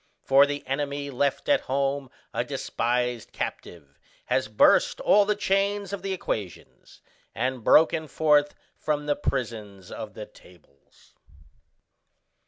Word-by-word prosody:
For 135 +1 +5
the 145 0 -5
enemy 140 +1 -3
left 140 +2 -1
at 290 - +4
home 135 0 -1 0.2
a - - 0
despised 120 0 -2
captive 70 -5 -7 0.3
has - - 0
burst - - +3
all 205 0 +4
the 210 +1 +1
chains 200 0 0
of 200 - -4
the 195 - -4
equations, 105 - -6 0.3
and 125 0 -2
broken 160 +3 +4
forth 150 -1 +2 0.2
from 150 -1 -2
the 145 -1 +1
prisons 105 -7 -4
of - - -8
the - - -7
tables." 85 -6 -22
140 Hz, 125 wpm, -26 LUFS, 120-155 Hz, 0.3 s, For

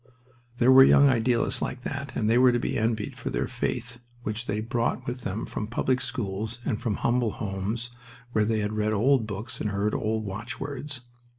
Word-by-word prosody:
There 125 +2 +5
were 135 0 +10
young 140 +1 +7
idealists 120 -1 +2
like 125 -1 -3
that, 140 0 -5
and 105 - 0
they 115 +2 +4
were 130 0 +7
to 120 - +2
be 120 - -2
envied 110 -1 -1
for - - -5
their - - -1
faith, 120 +1 -3 0.2
which 110 +2 -3
they 105 +1 -1
brought 115 +2 -1
with 125 +1 -4
them 100 0 -3
from 105 - -4
public 125 +3 0
schools 110 -1 -3
and 110 -6 -1
from 110 -4 0
humble 120 -1 +1
homes 105 +4 -3 0.4
where 110 -2 +2
they 110 0 +1
had 105 +1 -2
read 110 0 0
old 115 +2 +3
books 110 +4 -6
and 105 - 0
heard 100 +1 0
old 110 0 -1
watchwords. 135 +6 -5
115 Hz, 195 wpm, -27 LUFS, 105-125 Hz, 0.4 s, were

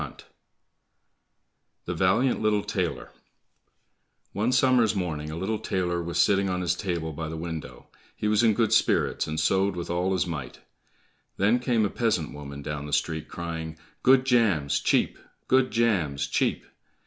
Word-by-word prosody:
20 - - -10 1.6
The 90 - -3
Valiant 95 +9 +2
Little 105 -1 +2
Tailor - - -3 1.2
One 110 +5 0
summer's 125 -4 +3
morning 80 -5 -3
a 80 - -5
little 100 +6 -2
tailor 90 -2 -1
was 85 0 -4
sitting 95 +3 +3
on 90 0 -1
his 90 -1 +1
table 85 -5 -3
by 80 +1 -5
the 80 - -5
window; 80 -7 -7 0.3
he 105 - -2
was 105 0 +3
in 110 -3 +4
good 115 -1 +2
spirits, - - +2
and 80 0 -3
sewed 95 +4 +2
with 85 -1 -4
all 90 +2 0
his 90 -1 +1
might. 75 -8 -6 0.8
Then 105 +6 +3
came 120 -3 +1
a - - 0
peasant 105 -11 -1
woman 70 -1 -8
down 75 0 -5
the 75 - -6
street 80 +2 -1
crying, 80 -2 -6 0.2
"Good 130 0 +5
jams, 105 - +2
cheap! - - +1 0.3
Good 130 0 +3
jams, 85 -12 +1
cheap!" 70 - -1
90 Hz, 160 wpm, -26 LUFS, 80-110 Hz, 1.6 s, Good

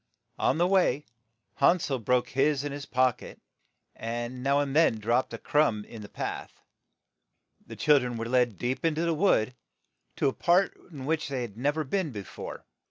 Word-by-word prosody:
On - - +2
the 175 - +3
way, 180 -7 +2 0.5
Han 155 +6 +5
sel 140 -6 -2
broke 125 +2 +1
his 140 +1 +1
in 145 - -3
his 145 0 -7
pock 130 -2 +2
et, - - -11 0.6
and 120 +2 -4
now 140 +2 +2
and 140 -1 -1
then 160 -7 +5
dropped 120 +4 +1
a - - -5
crumb 130 -9 +1
on 115 - -8
the 105 - -10
path. - - -6 1.1
The - - -8
chil 150 -2 +4
dren 125 -2 -4
were 115 - -3
led 120 -3 +1
deep 125 +6 -2
in 165 -2 +2
to 165 +2 0
the 165 - +1
wood, 150 - +2 0.6
to - - +1
a 135 - +1
part 180 +3 +2 0.2
in 140 -4 -8
which 160 +2 0
they 130 -3 -2
had 110 -4 -7
nev 145 +6 0
er 155 - 0
been 170 +4 -1
be 105 -6 -6
fore. - - -9
135 Hz, 200 wpm, -28 LUFS, 120-150 Hz, 1.1 s, Han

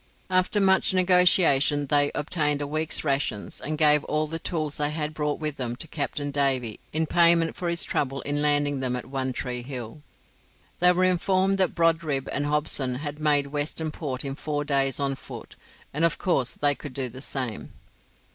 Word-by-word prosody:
After 185 +3 +2
much 190 -1 +3
negotiation, 180 -6 +4
they 145 0 +2
obtained 150 -1 0
a 145 - -3
week's 155 +2 -2
rations, 135 -8 -2
and 155 +1 -3
gave 150 -1 +4
all 155 0 0
the 165 +2 -5
tools 155 -4 -2
they 145 0 0
had 150 0 -3
brought 150 -1 -2
with 150 -2 -3
them 120 -2 -2
to 150 - -6
Captain 145 -1 -3
Davy 135 -6 0
in 160 +1 0
payment 170 0 +4
for 175 - -3
his 170 -1 -1
trouble 135 0 -2
in 145 +1 -1
landing 145 -1 +1
them 130 -1 -1
at 125 - -5
One 130 -1 -2
Tree 125 -1 -4
Hill. 125 +1 -7 0.8
They 180 0 +6
were 180 +1 +1
informed 185 +2 +2
that 185 - +1
Brodribb 165 -5 +1
and 145 0 -1
Hobson 145 -3 0
had 145 +2 -5
made 145 -2 +3
Western 155 +2 -2
Port 140 -4 -4
in 135 - -3
four 145 0 -3
days 135 -2 +1
on 140 -1 0
foot, 135 - -10 0.4
and 150 +3 0
of 170 -1 +2
course 135 -10 0
they 145 -1 +2
could 140 -2 -10
do 130 -2 -1
the 130 +2 -10
same. 130 -6 -4
145 Hz, 185 wpm, -25 LUFS, 135-160 Hz, 0.8 s, They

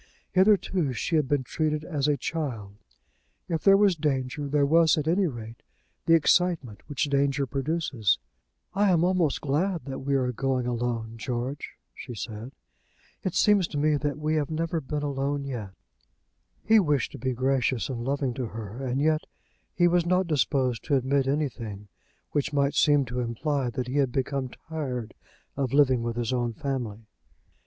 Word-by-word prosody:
Hitherto 185 -6 +3
she 145 - -1
had 150 -4 +2
been 140 -1 +1
treated 155 +2 -1
as 150 -4 -1
a 145 -1 +2
child. 125 -10 -4 0.7
If 165 -2 -2
there 195 0 +7
was 200 -3 +4
danger, 145 -2 -1
there 145 0 +2
was, 160 +2 +4
at 150 0 -1
any 185 +3 +3
rate, 115 -4 -8 0.5
the 165 - +7
excitement 165 - +2
which 145 - -1
danger 140 -1 +1
produces. 135 - 0 0.6
"I 200 +1 +3
am 170 -2 +3
almost 180 -5 +1
glad 165 +5 0
that 135 -1 -5
we 140 +1 0
are 125 -2 +1
going 130 +1 -1
alone, 120 -2 -2
George," 125 +4 -4 0.2
she 125 - -8
said. 110 +3 -6 0.7
"It 185 - -3
seems 205 -4 +4
to 150 - -5
me 150 +1 +3
that 145 0 -2
we 155 +1 -1
have 145 -2 -1
never 165 +1 -1
been 150 +1 -3
alone 140 0 -1
yet." 120 -7 -5 0.9
He 220 0 +6
wished 150 - +1
to - - -9
be 130 -1 -1
gracious 130 -1 +1
and 120 -3 -4
loving 135 -1 -1
to 125 -1 -3
her, 110 +3 -7
and 130 +1 -1
yet 155 +1 +2 0.5
he 175 -1 +3
was 175 0 +3
not 185 +1 +3
disposed 130 - +1
to 145 - +2
admit 135 +1 +1
anything 115 -8 -3 0.4
which 145 0 0
might 140 0 +2
seem 145 -2 +4
to 125 +1 -4
imply 125 +3 -1
that 125 +1 -4
he 130 +3 -2
had 135 -3 +2
become 135 0 -1
tired 130 -7 -5 0.4
of 135 -3 -2
living 130 -4 +4
with 115 0 -3
his 120 0 -1
own 120 -2 0
family. 115 -4 -4
140 Hz, 170 wpm, -27 LUFS, 125-155 Hz, 0.9 s, there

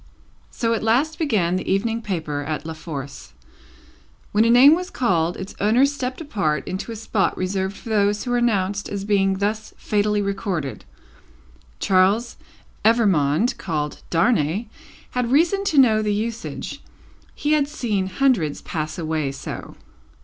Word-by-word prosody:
So 230 -1 -1
at 225 - -1
last 265 +8 +1
began 200 - +1
the - - -3
Evening 225 +4 0
Paper 160 -8 -3
at 155 +1 -4
La 160 - -4
Force. 140 -4 -8 1.0
When 210 +1 +4
a - - +3
name 255 +5 +8
was 360 +2 -1
called, 175 - 0
its 190 - -7
owner 225 +6 +4
stepped 265 -2 -3
apart 195 - -1
into 190 +5 -4
a - - -5
spot 215 -2 -1
reserved 190 +1 -2
for 230 - -10
those 205 -1 +2
who 245 - -3
were 245 - +2
announced 205 -4 0
as 200 -1 -4
being 195 -2 +2
thus 215 +2 -2
fatally 210 0 0
recorded. 190 - -3 0.9
Charles 195 +5 +2 0.5
Evrémonde, 210 - +3
called 150 -4 -3
Darnay, 175 +1 +1 0.5
had 250 -1 -1
reason 345 +8 +3
to 315 - 0
know 225 -5 +5
the 210 -1 0
usage; 225 +2 -4 0.5
he 295 - -1
had 300 -2 +3
seen 220 -10 -2
hundreds 190 - +1
pass 155 -1 -4
away 155 -4 -1
so. 135 - -7
205 Hz, 150 wpm, -22 LUFS, 180-235 Hz, 1.0 s, name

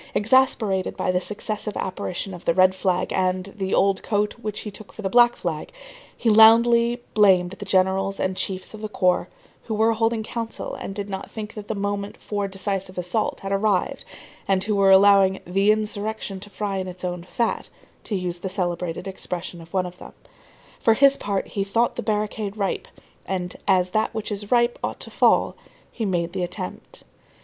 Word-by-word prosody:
Exasperated 220 -5 +2
by - - 0
the 180 0 0
successive 210 +1 -3
apparition 185 0 -4
of 175 - -9
the 170 - +2
red 185 0 +5
flag 185 -1 0
and 185 +1 0
the 190 -2 -1
old 195 -1 +2
coat 210 -1 0
which 215 -2 -4
he 210 - -6
took 210 +1 -11
for 215 - -10
the 190 - -1
black 240 0 +6
flag, 160 -4 -4 0.5
he - - -3
loudly 235 +2 +6
blamed 185 -4 +4
the 205 +1 -8
generals 190 +1 +1
and 185 0 -1
chiefs 185 +1 -3
of 215 - -9
the 215 - -4
corps, 185 -3 +1 0.4
who 220 - -2
were 220 +2 +3
holding 225 0 0
council 230 0 -5
and 195 - -6
did 200 -1 -4
not 195 -1 -6
think 220 -1 -7
that 210 -1 -8
the 220 - -2
moment 200 0 -3
for 205 -1 -3
the - - -12
decisive 195 -1 -3
assault 180 +5 -1
had 195 - -5
arrived, 200 -1 +1 0.4
and 190 -1 +2
who 210 +1 0
were 195 -1 +4
allowing 195 0 +6
"the 195 +4 +3
insurrection 215 -2 -2
to 205 - -9
fry 200 -1 -3
in 185 -1 -3
its 180 0 -9
own 180 -1 -3
fat," 225 +5 -2 0.3
to 210 - -3
use 180 -2 -2
the 190 - -4
celebrated 180 -1 -3
expression 180 -2 -5
of 165 0 -14
one 185 -1 0
of 180 0 -9
them. - - -11 0.7
For 225 - +4
his 275 +3 +6
part, 200 -5 -2
he 200 - -1
thought 230 +5 +1
the - - -3
barricade 210 -1 -2
ripe, 200 -2 -2 0.4
and 180 -2 -3
as 185 -2 +3
that 215 +3 0
which 220 -1 -4
is 205 0 -5
ripe 240 -1 +3
ought - - -3
to - - -5
fall, - - +3 0.4
he 225 - -3
made 175 -3 -1
the 190 - -2
attempt. 180 +1 -6
195 Hz, 195 wpm, -23 LUFS, 185-215 Hz, 0.7 s, black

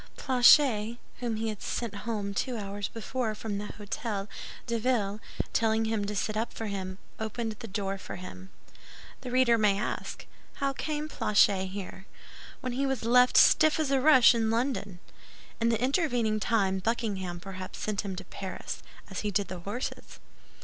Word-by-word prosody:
Planchet*, 245 -3 +5 0.2
whom 235 -3 -1
he 220 +1 -1
had 210 -2 -6
sent 235 -4 -3
home 205 -3 -2
two 245 +4 -1
hours 200 -1 -4
before 225 0 -3
from 210 -2 -4
the 205 - -4
Hôtel 205 -1 -4 0.4
de 235 -1 -1
Ville, 215 -4 0 0.3
telling 225 0 +2
him 220 -2 0
to 210 +1 -3
sit 215 +2 -1
up 225 +2 -1
for 225 - -5
him, 190 -2 -4 0.2
opened 220 +1 -3
the 230 - -7
door 195 -1 -3
for - - -7
him. 95 - -9 0.4
* - - -18
The 255 - -6
reader 245 -2 +4
may 205 -2 +3
ask, 210 - -4 0.3
"How 275 -1 -1
came 300 +2 -3
Planchet 205 -8 +3
here?" 190 0 -7 0.5
when 255 -1 -3
he 275 +2 0
was 265 -3 -1
left 250 +2 +5
"stiff 310 -1 +6
as 300 -3 0
a 270 -1 +3
rush" 260 -4 +7
in 225 -2 +1
London. 225 -5 -1 0.6
In 230 0 +2
the 225 -2 +1
intervening 245 -5 +1
time 195 -3 +1
Buckingham 195 -4 -2
perhaps 185 0 -7
sent 210 -2 -1
him 195 -3 -4
to 190 +1 -7
Paris, 190 +1 -6 0.3
as - - -3
he 210 - -1
did 200 -1 0
the 185 -1 -5
horses. 205 +8 -5
220 Hz, 175 wpm, -29 LUFS, 200-245 Hz, 0.6 s, rush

